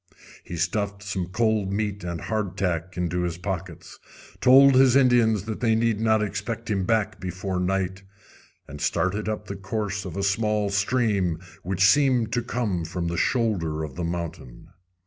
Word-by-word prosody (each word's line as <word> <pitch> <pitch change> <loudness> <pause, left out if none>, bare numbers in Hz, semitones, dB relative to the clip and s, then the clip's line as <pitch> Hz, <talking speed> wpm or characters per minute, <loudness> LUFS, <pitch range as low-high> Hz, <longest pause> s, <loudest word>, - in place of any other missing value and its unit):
He 85 - -7
stuffed 100 +4 -2
some 95 -3 -3
cold 105 0 0
meat 105 -1 -2
and 85 -1 -4
hard 105 -4 -3
tack 90 -1 -2
into 90 0 -1
his 85 -1 -2
pockets, 90 -2 -6 0.4
told 135 +2 +7
his 130 -1 +5
Indians 120 -6 +4
they 110 +1 0
need 115 -2 +1
not 110 -1 +2
expect 110 +2 -4
him 95 -2 0
back 105 -1 0
before 90 0 -3
night, 95 +1 -1 0.7
and - - -9
started 105 +3 0
up 110 - -4
the 100 - -6
course 105 +1 -3
of 90 0 -7
a 100 - -1
small 105 +1 +1
stream 100 -4 +1 0.2
which 95 +1 -1
seemed 125 0 +3
to 120 - +1
come 115 -7 -2
from 85 +1 -3
the 85 - -3
shoulder 90 - 0
of 75 -4 -6
the 90 - -5
mountain. 85 -7 -6
100 Hz, 165 wpm, -25 LUFS, 90-110 Hz, 0.7 s, told